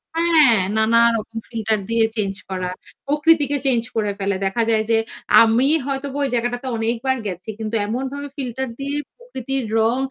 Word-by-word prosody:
হ্যাঁ, 320 -9 +5 0.2
নানা 220 +1 +4 0.2
রকম 225 +1 -7
ফিল্টার 220 -3 -1
দিয়ে 230 -1 +3
চেঞ্জ 200 -3 -1 0.2
করা। 185 -1 -3 0.4
প্রকৃতিকে 295 -1 +3
চেঞ্জ 240 -4 +2
করে 210 -2 0
ফেলে। 195 0 0
দেখা 210 +5 +1
যায় 220 -1 +2
যে 225 - +4 0.5
আমি 230 +4 +3 0.2
হয়তো 275 0 -3
ওই 280 - +2
জায়গাটাতে 245 +2 -1
অনেকবার 235 +4 -1
গেছি। 180 +2 -6
কিন্তু 220 +1 -3
এমনভাবে 265 +5 -4
ফিল্টার 265 0 -3
দিয়ে 280 +1 -3 0.2
প্রকৃতির 270 - -4 0.2
রং 225 +3 +2
240 Hz, 155 wpm, -21 LUFS, 220-275 Hz, 0.5 s, হ্যাঁ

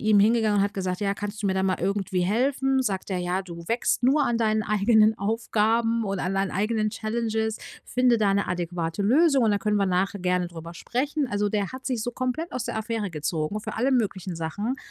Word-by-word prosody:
ihm 215 -2 +4
hingegangen 215 -1 +3
und 195 - +4
hat 200 - -2
gesagt: 185 -1 -3
„Ja, 200 -1 0
kannst 205 +1 -6
du 200 - +1
mir 190 - 0
da 190 0 +1
mal 185 -1 +1
irgendwie 190 0 -1
helfen?“ 265 +7 +1
Sagt 200 -6 -2
er: 185 - 0
„Ja, 180 +2 -1
du 170 -2 -9
wächst 235 +2 0
nur 280 +4 +4
an 235 -1 0
deinen 215 -1 +1
eigenen 215 +1 +3
Aufgaben 225 +2 +1
und 195 -2 -2
an 185 +2 -1
deinen 195 0 0
eigenen 215 +2 0
Challenges. 220 0 -2 0.3
Finde 250 -2 +2
da 205 -2 +3
'ne 200 - +1
adäquate 175 0 -2
Lösung 275 +5 +4
und 220 - +3
da 205 - +2
können 210 +1 0
wir 200 - +2
nachher 190 +2 0
gerne 180 0 +1
drüber 170 0 -9
sprechen.“ 280 - -2
Also 205 -2 0
der 205 0 -2
hat 260 0 -8
sich 250 -4 -1
so 245 - -3
komplett 255 +8 -3
aus 250 - -3
der - - -4
Affäre 220 -2 -3
gezogen 155 +4 -2
für 215 0 -6
alle 250 +5 +1
möglichen 190 -7 -1
Sachen. 200 +10 -3
210 Hz, 220 wpm, -25 LUFS, 190-230 Hz, 0.3 s, ihm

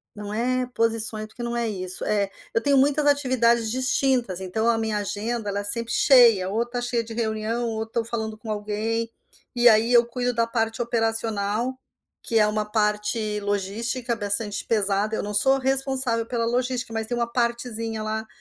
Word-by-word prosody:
não 205 0 -7
é 250 +3 0
posições, 225 -1 +1
porque 240 +3 -9
não 235 0 -3
é 235 -1 -1
isso. 185 -3 -3
É, 205 -2 0 0.2
eu 230 - +1
tenho 280 -1 +3
muitas 290 +2 +3
atividades 240 -5 +2
distintas, 255 -6 +1
então 220 +5 -2
a 230 - +2
minha 220 -1 -1
agenda 210 +2 -3
ela 200 0 -2
é - - -4
sempre 230 +3 -2
cheia, 235 -9 +5
ou 220 +4 0
está 240 +1 -5
cheia 240 -1 -1
de 225 - -9
reunião, 225 +1 -2
ou 220 0 -3
estou 225 +1 -3
falando 220 -1 -4
com 215 0 -7
alguém. 215 +2 -2 0.5
E 240 0 +6
aí 225 +2 +3
eu 240 -1 +6
cuido 245 +1 -2
da 230 -1 +1
parte 225 0 -1
operacional, 225 +1 -1 0.4
que 230 - -1
é 210 - +5
uma 210 0 -1
parte 210 0 0
logística 210 +5 -2
bastante 205 -1 -1
pesada. 210 0 0
Eu - - -3
não 210 - -5
sou 265 +6 +3
responsável 265 -3 0
pela 230 0 -2
logística, 250 0 -1
mas 220 -1 -2
tem 240 - -2
uma 235 0 -2
partezinha 235 -2 -2
lá 220 +1 -3
225 Hz, 185 wpm, -24 LUFS, 215-240 Hz, 0.5 s, E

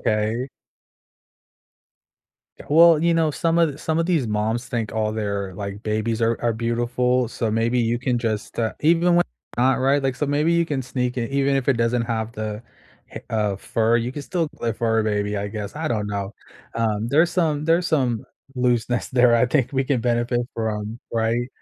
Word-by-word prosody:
okay. 110 +4 0 2.1
Ju - - -10
well, 165 +1 +6
you 170 0 +3
know, 160 -2 +2
some 165 +3 0
of 155 -3 +1
some 160 0 -1
of 165 - +2
these 165 -8 +1
moms 110 +3 -1
think 115 -5 -3
all 110 -1 0
their, 100 -3 -3
like, 100 +1 -6
babies 110 +1 -1
are 115 0 +1
are 120 - +2
beautiful, 120 +2 0
so 115 -1 -2
maybe 115 +3 +1
you 120 0 +1
can 125 -1 0
just, 110 -3 -3
uh, 110 -1 0
even 170 +3 +3
when 175 0 +4 0.3
not 130 +2 +3
right, 135 +2 +2
like, 135 -1 0
so 150 - -1
maybe 150 +4 +1
you 170 0 +2
can 140 -4 -2
sneak 125 0 -2
it, 115 -1 -2
even 140 0 +2
if 135 -1 -2
it 140 - +5
doesn't 115 +1 +1
have 115 -1 -3
the 110 -1 -5 0.5
ha - - -7
uh, 105 -3 0
fur, 115 +4 +1
you 120 +2 -2
can 145 - -5
still 165 +1 -1
a 115 -1 0
fur 115 0 +1
baby, 105 -1 -1
I 100 0 -3
guess, 105 -1 -6
I 155 +1 -3
don't 105 -3 -1
know, 100 0 -4 0.4
um, 110 -1 -1
there's 160 +6 +3
some 155 -5 0
there's 165 +2 +2
some 130 -9 0 0.3
looseness 125 -1 0
there 125 -1 +4
I 115 +1 +4
think 130 0 0
we 135 -1 +1
can 130 -2 0
benefit 120 0 0
from, 110 0 -3
right? 115 +2 0
120 Hz, 195 wpm, -22 LUFS, 110-140 Hz, 2.1 s, well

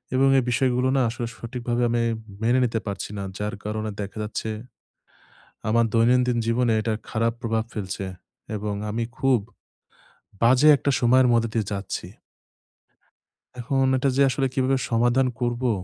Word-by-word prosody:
এবং 135 +1 +4
এই - - 0
বিষয়গুলো 125 0 +2
না 130 - +3
আসলে 120 +1 -4
সঠিকভাবে 120 0 -3
আমি 120 0 +1 0.4
মেনে 120 +3 +3
নিতে 115 -1 -1
পারছি 100 -1 -4
না। 100 - -3
যার 105 0 -3
কারণে 110 +1 -3
দেখা 100 +2 -7
যাচ্ছে 110 +1 -4 1.2
আমার 115 +1 +3
দৈনন্দিন 125 +1 +3
জীবনে 115 0 +2
এটার 110 0 -1
খারাপ 115 0 0
প্রভাব 115 -2 0
ফেলছে 95 -2 -4 0.5
এবং 105 0 -3 0.2
আমি 115 +2 -1
খুব 135 -3 +3 1.0
বাজে 130 +5 +5
একটা 140 - -1
সময়ের 125 +1 +5
মধ্য 115 -1 +3
দিয়ে 110 -4 0
যাচ্ছি। 100 -1 -4 1.5
এখন 135 +2 +1
এটা 130 +2 +1
যে 140 - +5
আসলে 135 +1 0
কিভাবে 135 0 +2
সমাধান 120 +3 +3
করবো? 120 0 0
120 Hz, 145 wpm, -24 LUFS, 110-125 Hz, 1.5 s, বাজে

